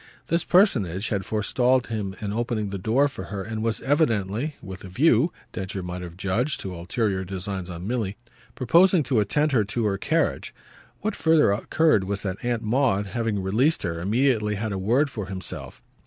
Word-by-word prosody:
This 170 +1 +2
personage 110 - +3
had 100 -3 -1
forestalled 125 +4 +1
him 105 -4 -4
in 105 -1 -3
opening 115 -2 -1
the 100 - -4
door 120 +9 +3
for 95 -9 -7
her 100 -1 -5
and 110 +2 -4
was 115 0 -1
evidently 130 - 0
with 95 0 -9
a - - -7
view, 130 - +3 0.2
Densher 95 0 -4
might 90 0 -5
have 85 -1 -8
judged, 110 +10 -1
to 95 - -5
ulterior 95 +2 -1
designs 95 0 -5
on 85 0 -7
Milly 110 -3 -2 0.4
proposing 170 +7 +4
to 125 -3 +1
attend 150 +9 +1
her 120 -6 +3
to 110 +2 -2
her 100 -2 0
carriage. - - 0 0.5
What 210 0 -1
further 160 -8 +4
occurred 110 +1 +2
was 100 +1 -3
that 95 -2 -4
Aunt 120 -2 -1
Maud, 115 -3 +2
having 110 -1 -2
released 120 +12 +1
her, 85 -2 -3
immediately 110 +1 +1
had 110 +2 -3
a 95 - -2
word 125 +9 +2
for 105 -6 -5
himself. 95 -1 -7
110 Hz, 185 wpm, -25 LUFS, 95-130 Hz, 0.5 s, proposing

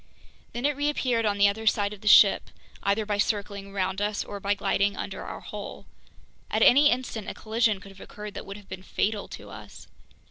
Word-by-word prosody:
Then 240 +3 -3
it 290 0 +2
reappeared 260 -6 0
on 205 -1 0
the 200 0 +6
other 220 +2 -2
side 205 -1 +2
of 200 - -12
the 210 - -7
ship, 205 -1 +7 0.3
either 205 +2 +1
by 205 -1 -2
circling 200 -2 -1
around 190 0 -2
us 205 0 -1
or 205 - -7
by 200 +1 0
gliding 200 0 0
under - - -5
our - - -7
hull. - - -8 0.6
At - - +2
any 290 +3 +7
instant 245 -5 -2
a - - -6
collision 220 -2 +1
could 195 +1 -13
have 195 - -15
occurred 210 -1 -9
that - - -8
would 195 +1 -7
have 205 -2 -15
been 185 0 -8
fatal 205 +2 -2
to - - -10
us. - - -11
205 Hz, 210 wpm, -26 LUFS, 200-220 Hz, 0.6 s, ship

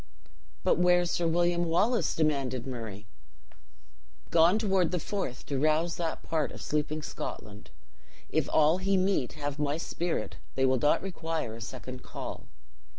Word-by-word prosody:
"But - - +3
where 180 0 +5
is 175 - -1
Sir 170 - +1
William 175 +1 +2
Wallace?" 210 +9 +2
demanded 140 -6 0
Murray. 110 -6 -6 1.3
"Gone 170 +4 +6
toward 195 -6 +2
the 180 - -1
Forth, 165 -8 -4
to 140 -2 -2
rouse 155 +3 +2
that 165 -2 -3
part 155 -3 0
of - - -9
sleeping 150 +1 -1
Scotland. 105 -7 -7 0.6
If - - +1
all 155 +3 +4
he 195 +1 +2
meet 185 -9 +1
have 145 -1 -4
my 145 0 0
spirit, 165 -7 -3 0.2
they 135 - +3
will 130 -1 +3
not 145 +7 +3
require 165 - -3
a 115 - -9
second 125 +4 -7
call. - - -7
160 Hz, 150 wpm, -29 LUFS, 135-175 Hz, 1.3 s, Gone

